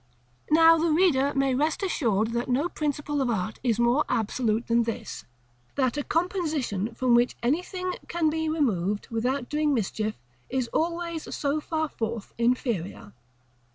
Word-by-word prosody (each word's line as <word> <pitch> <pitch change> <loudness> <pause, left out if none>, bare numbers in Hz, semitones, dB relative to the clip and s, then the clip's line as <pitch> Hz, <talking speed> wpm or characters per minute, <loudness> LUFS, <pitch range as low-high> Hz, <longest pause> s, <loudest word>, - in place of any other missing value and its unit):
Now 325 +1 +6
the 335 +1 +2
reader 305 -5 +3
may 275 -1 +2
rest 300 +8 0
assured 225 - +1
that 235 +2 -2
no 270 +7 +2
principle 295 -3 -2
of 260 - 0
art 215 -1 -2
is 235 -3 +1
more 240 +4 +3
absolute 230 -1 0
than 235 0 +3
this, 230 -1 -5 0.5
that 260 -2 +1
a 290 - -2
composition 310 - -1
from 255 -2 +2
which 240 +1 +3
anything 360 +7 -1
can 340 -2 0
be 320 0 0
removed 210 - 0
without 245 +3 -1
doing 300 -1 +1
mischief 215 -1 -2 0.3
is 260 -2 -1
always 335 0 -2
so 285 +1 0
far 315 0 -1
forth 225 -5 -5
inferior. 230 - -1
265 Hz, 150 wpm, -26 LUFS, 230-315 Hz, 0.5 s, Now